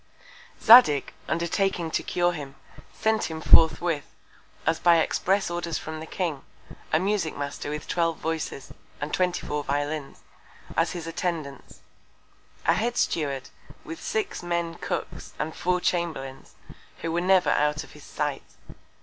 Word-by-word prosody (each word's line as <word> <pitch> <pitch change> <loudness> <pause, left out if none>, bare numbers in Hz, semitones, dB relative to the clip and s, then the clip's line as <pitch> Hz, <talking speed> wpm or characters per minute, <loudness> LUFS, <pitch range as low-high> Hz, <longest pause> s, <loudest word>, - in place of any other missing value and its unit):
Zadig, 220 - +7
undertaking 170 +1 0
to - - 0
cure 175 0 +1
him, 145 -5 -7 0.4
sent 220 0 0
him 160 -1 -5
forthwith, 160 -1 +4 0.5
as 160 0 +1
by 175 -1 +6
express 190 +3 +1
Order 175 -1 -3
from 160 0 -5
the 160 - -8
King, 165 -7 -2 0.5
a - - +4
Musick 190 -2 0
Master 145 0 -4
with 150 0 -5
twelve 165 -2 0
Voices, 160 -4 -4 0.3
and 145 +1 -4
24 175 -5 0
Violins, 145 +1 -3 0.5
as 165 +1 +1
his 175 -2 -5
Attendants; 165 -4 -4 0.8
a - - +5
Head 240 +2 -1
Steward, 140 -5 -1 0.3
with 165 - -8
six 220 -1 -2
Men 170 -1 -1
Cooks, - - -5
and 160 - -3
4 180 0 +1
Chamberlains, 160 -7 -3 0.5
who 165 - -1
were 170 +1 0
never 185 0 +4
to - - +3
be - - +2
out 150 +1 0
of - - -15
his 150 - -14
Sight. 150 -2 -3
165 Hz, 145 wpm, -26 LUFS, 150-175 Hz, 0.8 s, Zadig